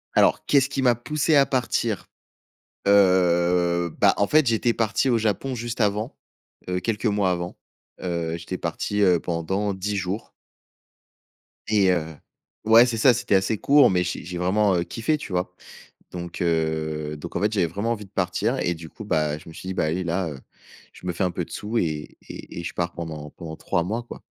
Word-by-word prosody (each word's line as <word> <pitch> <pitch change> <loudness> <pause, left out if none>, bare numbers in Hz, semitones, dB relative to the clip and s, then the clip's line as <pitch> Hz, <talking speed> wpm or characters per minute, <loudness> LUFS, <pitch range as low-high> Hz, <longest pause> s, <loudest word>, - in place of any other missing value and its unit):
Alors, - - +3
qu'est-ce 135 -2 +3
qui 135 -2 -2
m'a 125 -2 +5
poussé 150 +6 0
à 140 -1 +6
partir? 120 -5 -1 0.8
Heu, 90 -3 +3
bah - - +5
en 100 - +2
fait, 155 +3 +4
j'étais 115 +1 +2
parti 115 +3 +1
au 120 - +3
Japon 115 +5 -1
juste 120 0 -5
avant. 105 +4 0 0.5
Heu, 90 0 -1
quelques 110 +3 -2
mois 100 -3 +2
avant. 85 0 -3 0.5
Heu, 85 -2 -2
j'étais 85 +2 -6
parti, 90 +5 -2
heu, 90 -4 +4
pendant 95 +4 -2
10 100 +2 -3
jours 95 +3 -3 1.4
et 100 -3 +4
heu 80 -3 -2 0.5
ouais, 115 +2 +8
c'est 120 -2 -2
ça, 125 +3 +6
c'était 120 -3 +1
assez 95 +3 +1
court, 145 +6 +5
mais 90 -1 +2
j'ai 90 - -4
j'ai 90 0 -5
vraiment, 95 +2 +2
heu, 85 - +1
kiffé, 115 - -1
tu 125 - -9
vois? 90 0 -1 0.6
Donc, 85 0 -6
heu, 80 -2 -1
donc 75 - -9
en - - -1
fait, 105 +1 +2
j'avais 95 -5 +2
vraiment 100 +8 -2
envie 105 -3 -3
de 95 - -20
partir 100 +6 0
et 85 - 0
du 80 0 -10
coup, 110 - -10
bah, 75 -5 0
je 80 - -13
me - - -11
suis 95 - -9
dit: 95 - -2
«Bah, - - +1
allez 85 +4 -1
là, 85 +1 -1
heu, 70 -3 -8 0.5
je - - -14
me - - +1
fais 85 - -1
un 90 - 0
peu - - -3
de - - -18
sous 110 +3 -3
et 75 -6 -2
et - - -8
et - - -5
je - - -5
pars 85 -1 -2
pendant 80 -3 -7
pendant 80 -2 -8
3 85 - -1
mois, 110 +7 -3
quoi». 120 - -11
95 Hz, 205 wpm, -24 LUFS, 85-110 Hz, 1.4 s, ouais